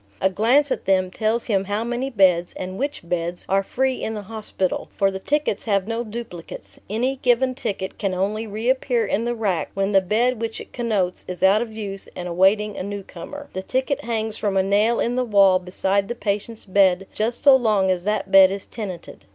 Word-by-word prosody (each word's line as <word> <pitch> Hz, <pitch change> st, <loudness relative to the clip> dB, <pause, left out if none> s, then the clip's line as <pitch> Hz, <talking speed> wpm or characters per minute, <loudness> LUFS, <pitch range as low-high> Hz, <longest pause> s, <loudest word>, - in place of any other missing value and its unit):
A 190 Hz, -, +2 dB
glance 255 Hz, +9 st, +3 dB
at -, -, -2 dB
them 185 Hz, -1 st, +2 dB
tells 220 Hz, +3 st, -1 dB
him 195 Hz, -4 st, 0 dB
how 205 Hz, +3 st, -1 dB
many 245 Hz, +3 st, -2 dB
beds, 185 Hz, -7 st, +3 dB
and 185 Hz, +2 st, -6 dB
which 280 Hz, -10 st, -3 dB
beds, 175 Hz, 0 st, -3 dB
are 195 Hz, +1 st, +2 dB
free 260 Hz, +6 st, -1 dB
in 220 Hz, -, -2 dB
the 210 Hz, -, -5 dB
hospital; 210 Hz, -3 st, -3 dB
for 195 Hz, 0 st, +3 dB
the 190 Hz, -, -5 dB
tickets 295 Hz, +1 st, -1 dB
have 200 Hz, -3 st, +1 dB
no 230 Hz, +1 st, -2 dB
duplicates; 215 Hz, -7 st, -8 dB
any 250 Hz, +6 st, -1 dB
given 255 Hz, +1 st, +2 dB
ticket 205 Hz, -7 st, -4 dB
can 195 Hz, -3 st, -1 dB
only 210 Hz, +4 st, -1 dB
reappear 235 Hz, +2 st, 0 dB
in 215 Hz, +3 st, -1 dB
the 240 Hz, 0 st, -1 dB
rack 200 Hz, -7 st, -1 dB
when 195 Hz, +1 st, 0 dB
the 195 Hz, -1 st, +5 dB
bed 225 Hz, +5 st, +1 dB
which 225 Hz, -1 st, -3 dB
it -, -, -11 dB
connotes 210 Hz, -7 st, -1 dB
is 180 Hz, 0 st, -6 dB
out 195 Hz, +3 st, +5 dB
of 235 Hz, -2 st, -4 dB
use 200 Hz, -3 st, -6 dB
and 180 Hz, -, -5 dB
awaiting 195 Hz, +4 st, +2 dB
a -, -, -3 dB
newcomer; 200 Hz, +8 st, -7 dB
the 190 Hz, -, -3 dB
ticket 265 Hz, +7 st, -1 dB
hangs 220 Hz, -2 st, -2 dB
from 200 Hz, -2 st, -1 dB
a 190 Hz, -, +4 dB
nail 210 Hz, +4 st, +2 dB
in 235 Hz, -, 0 dB
the 255 Hz, -, +1 dB
wall 200 Hz, -5 st, +5 dB
beside 190 Hz, +2 st, -1 dB
the 240 Hz, -, -4 dB
patient's 215 Hz, 0 st, -3 dB
bed 195 Hz, -1 st, +3 dB
just 225 Hz, +3 st, -2 dB
so 280 Hz, -2 st, +8 dB
long 210 Hz, -7 st, +2 dB
as 180 Hz, -1 st, -1 dB
that 210 Hz, -1 st, -1 dB
bed 195 Hz, -1 st, +8 dB
is 195 Hz, 0 st, -5 dB
tenanted. 190 Hz, -7 st, -8 dB
210 Hz, 210 wpm, -22 LUFS, 190-235 Hz, -, so